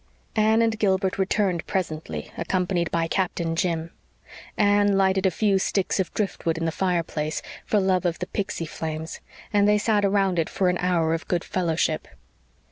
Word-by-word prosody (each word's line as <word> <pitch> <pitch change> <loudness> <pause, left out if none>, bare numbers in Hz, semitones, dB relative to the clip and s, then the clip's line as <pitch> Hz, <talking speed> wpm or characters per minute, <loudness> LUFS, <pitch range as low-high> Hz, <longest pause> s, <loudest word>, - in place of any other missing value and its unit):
Anne 220 +1 +4
and 225 -1 0
Gilbert 190 -2 +1
returned 190 -3 +1
presently, 170 -5 -3
accompanied 175 0 0
by 165 0 0
Captain 170 -2 -1
Jim. 165 -2 -1 0.7
Anne 205 -1 +4
lighted 190 0 +3
a - - +4
few 195 +2 +2
sticks 195 +1 0
of 185 -3 0
driftwood 170 -5 -1
in 165 - -2
the 165 - +1
fireplace, 165 -4 -1 0.2
for 210 - +3
love 190 -1 +2
of 175 -2 0
the 180 - -3
pixy 190 -3 -3
flames, 160 0 -5 0.3
and 205 0 +4
they 210 0 +5
sat 210 -1 +2
around 195 -3 +2
it 160 - 0
for 185 -2 +1
an 180 - +1
hour 170 -3 +1
of 165 - -3
good 175 -1 0
fellowship. 165 -3 -1
185 Hz, 170 wpm, -25 LUFS, 165-200 Hz, 0.7 s, they